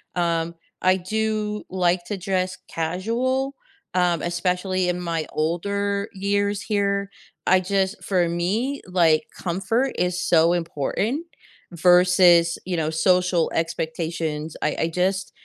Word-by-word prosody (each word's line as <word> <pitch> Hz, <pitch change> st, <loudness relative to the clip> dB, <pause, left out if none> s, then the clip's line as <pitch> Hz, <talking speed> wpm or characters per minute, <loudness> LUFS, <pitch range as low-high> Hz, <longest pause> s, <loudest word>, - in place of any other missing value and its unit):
Um, 170 Hz, -1 st, 0 dB, 0.3 s
I 185 Hz, +1 st, +4 dB
do 215 Hz, +2 st, -2 dB
like 180 Hz, -1 st, +1 dB
to 205 Hz, -, -4 dB
dress 185 Hz, -1 st, -1 dB
casual, 230 Hz, +11 st, -1 dB, 0.4 s
um, 175 Hz, -3 st, +2 dB
especially 180 Hz, +1 st, 0 dB
in 180 Hz, -, -1 dB
my 165 Hz, -3 st, -2 dB
older 200 Hz, +6 st, -1 dB
years 200 Hz, +1 st, 0 dB
here. 200 Hz, -2 st, 0 dB, 0.4 s
I 185 Hz, 0 st, +5 dB
just 190 Hz, +1 st, -1 dB
for 180 Hz, -3 st, +1 dB
me, 210 Hz, +11 st, -1 dB
like, 165 Hz, -4 st, +3 dB
comfort 225 Hz, +9 st, -1 dB
is 180 Hz, 0 st, 0 dB
so 165 Hz, +1 st, +4 dB
important 175 Hz, -, -2 dB, 0.5 s
versus, 175 Hz, -1 st, +5 dB
you 180 Hz, -2 st, -2 dB
know, 155 Hz, -1 st, 0 dB
social 180 Hz, +1 st, +2 dB
expectations. 160 Hz, -1 st, -3 dB
I 150 Hz, -, 0 dB
I 160 Hz, -, +1 dB
just 185 Hz, +3 st, -1 dB
180 Hz, 120 wpm, -23 LUFS, 170-200 Hz, 0.5 s, I